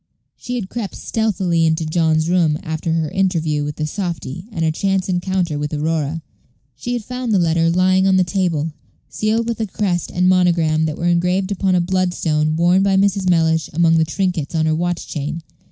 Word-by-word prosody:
She 250 - -6
had 225 -6 -3
crept 220 -1 -5
stealthily 190 -7 0
into 160 0 +1
John's 160 0 +1
room 170 -4 +2
after 160 +1 -3
her 160 -2 -1
interview 165 -6 0
with 145 0 -4
the 155 - -2
softy 175 -1 -5
and 165 -5 -2
her 160 - +2
chance 195 +3 -1
encounter 180 -4 -1
with 150 0 -3
Aurora. 155 +1 -2 0.5
She 160 - -4
had 240 -2 -3
found 250 +1 -4
the 205 - +4
letter 165 -1 +2
lying 185 +2 +3
on 190 - +4
the 185 - +4
table, 170 -4 -1 0.4
sealed 220 +2 -1
with 230 -1 -3
a 220 - -1
crest 185 -3 -2
and 180 +1 +1
monogram 170 -4 +3
that 155 -1 -3
were 170 - -3
engraved 180 +3 +1
upon 190 -1 +1
a 180 - +3
bloodstone 170 -4 0
worn 175 +3 +3
by 195 0 +2
Mrs. 195 -1 +2
Mellish 160 -2 +2
among 165 0 +3
the - - +4
trinkets 175 -2 -2
on 160 -1 +1
her 155 - +2
watch 175 +1 -2
chain. 155 +2 -4
175 Hz, 195 wpm, -19 LUFS, 160-190 Hz, 0.5 s, the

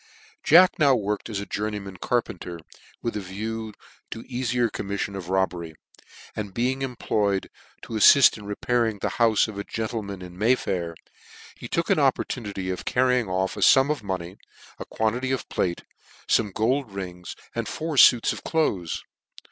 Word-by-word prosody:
Jack 180 +4 +6
now 140 -3 +5
worked 105 0 -2
as 105 -3 -3
a 100 - -5
journeyman 105 -3 -4
carpenter, 95 -8 -2 0.5
with 115 - -2
a - - -1
view 110 +4 -5 0.4
to 115 - -7
the - - -24
eafier 125 -1 0
commiflion 100 -1 -4
of 90 -3 -7
robbery; 90 -4 -1 0.6
and 100 -3 -5
heing 130 +3 0
employed 105 -6 -1 0.3
to 115 - -6
a - - 0
flail 140 +6 +8
in 105 - -11
repairing 115 +1 0
the - - -2
houie 115 -2 +4
of 105 -2 -7
a - - -3
gentleman 105 -4 -4
in 90 -1 -10
May 115 +5 +4
Fair, 85 -7 -3 0.6
he - - -9
took - - -1
an - - +3
oppor - - +2
tunity 100 -5 -4
of 90 - -7
carrying 125 -4 +1
off 95 +1 -1
a - - -6
fum 135 +2 +6
of 150 - -2
money, 95 -2 -5 0.4
a - - -6
quantity 120 +4 -1
of 130 - -2
plate, 85 -2 -1 0.4
fome 105 -3 +2
gold 120 +4 0
rings, 90 -3 -7 0.2
and - - -3
four 160 -1 -4
fuits 120 -3 +6
of - - -8
deaths. 100 - -1
105 Hz, 170 wpm, -25 LUFS, 95-120 Hz, 0.6 s, flail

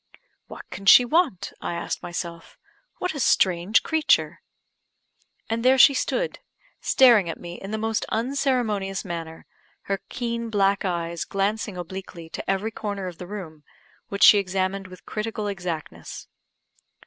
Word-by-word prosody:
"What - - -11
can 195 - -8
she 245 - +9
want?" 250 - +1
I 170 - -3
asked 170 - -4
myself. 170 -1 -6 0.4
"What 360 - -2
a 290 - -5
strange 185 -3 +3
creature!" 320 -1 +1 1.1
And 230 +1 -2
there 260 +1 +5
she 275 - +8
stood, - - -1 0.4
staring 235 -9 +5
at - - -5
me 175 0 -9
in 195 - -7
the 220 - -2
most 220 0 -1
unceremonious 225 -6 -1
manner, 165 -2 -6 0.4
her 195 -1 -3
keen 235 -1 -3
black 200 -2 +2
eyes 170 -2 -2
glancing 200 0 -2
obliquely 175 -2 -8
to - - -6
every 195 +3 0
corner 205 -3 -4
of 180 -2 -7
the 180 - -7
room, 170 -7 -8 0.5
which 200 -2 0
she 205 - +9
examined 190 0 -2
with 185 -1 -14
critical 215 0 -4
exactness. 170 - -6
195 Hz, 145 wpm, -24 LUFS, 180-225 Hz, 1.1 s, she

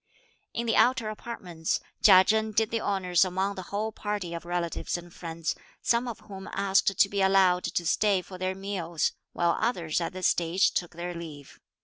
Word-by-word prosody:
In 235 - -3
the 225 - +1
outer 240 -3 +3
apartments, 180 -7 -3 0.2
Chia 185 -3 +8
Chen 220 +2 +1
did 220 +1 +1
the 230 -1 -1
honours 185 -3 +2
among 190 +2 -1
the 190 - -6
whole 215 +2 -2
party 205 -5 -4
of 170 0 -6
relatives 175 0 -2
and 175 0 -11
friends, 165 -1 -4 0.3
some 235 +1 +2
of 235 - -6
whom 195 -1 -9
asked 195 -1 +2
to - - +7
be 200 0 -2
allowed 190 -2 +4
to 175 - -2
stay 195 +1 +2
for 185 0 -10
their 185 0 -1
meals, 190 -4 -2 0.2
while 170 -1 +2
others 175 -9 0
at 170 - -3
this 185 -1 -3
stage 175 +3 +3
took 175 -2 -3
their 175 +1 -4
leave. 155 -5 -9
190 Hz, 190 wpm, -28 LUFS, 175-205 Hz, 0.3 s, Chia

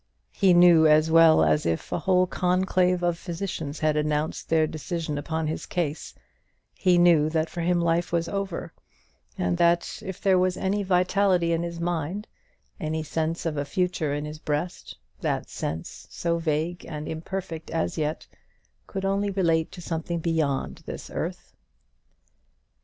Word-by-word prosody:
He 190 -3 +4
knew 175 -2 +7
as 155 +1 +4
well 165 - +7
as 75 -1 +2
if 80 -1 -2
a - - 0
whole 185 +1 +3
conclave 180 0 +1
of 175 -1 0
physicians 165 -4 -5
had 155 -1 +2
announced 150 0 -1
their 160 -1 +4
decision 155 0 -4
upon 160 +2 -2
his 155 +1 -4
case, 160 -4 -3 0.6
he 180 -2 +3
knew 170 -3 +5
that 160 0 -1
for 175 - -4
him 175 +1 +2
life 170 0 +1
was 170 -1 0
over; 195 -3 -4 0.6
and 90 -1 0
that 170 0 +2
if 190 -2 -6
there 190 -2 +3
was 185 0 +1
any 195 +2 0
vitality 185 -2 +2
in 165 - 0
his 170 0 -5
mind, 175 +4 -2 0.5
any 160 -2 -2
sense 160 +2 -2
of 155 -2 -1
a 145 - 0
future 165 0 -1
in 145 +1 -2
his 150 0 -7
breast, 155 +4 -4 0.2
that - - -2
sense, 80 +1 -5
so 170 -1 -1
vague 165 +2 -1
and 150 -2 -6
imperfect 165 0 -5
as 85 - -1
yet, 155 0 -2 0.6
could 195 -1 -4
only 200 +1 +1
relate 165 -5 +1
to 175 - -9
something 165 +1 -3
beyond 160 -4 -1
this - - -7
earth. - - -5
165 Hz, 160 wpm, -26 LUFS, 155-180 Hz, 0.6 s, knew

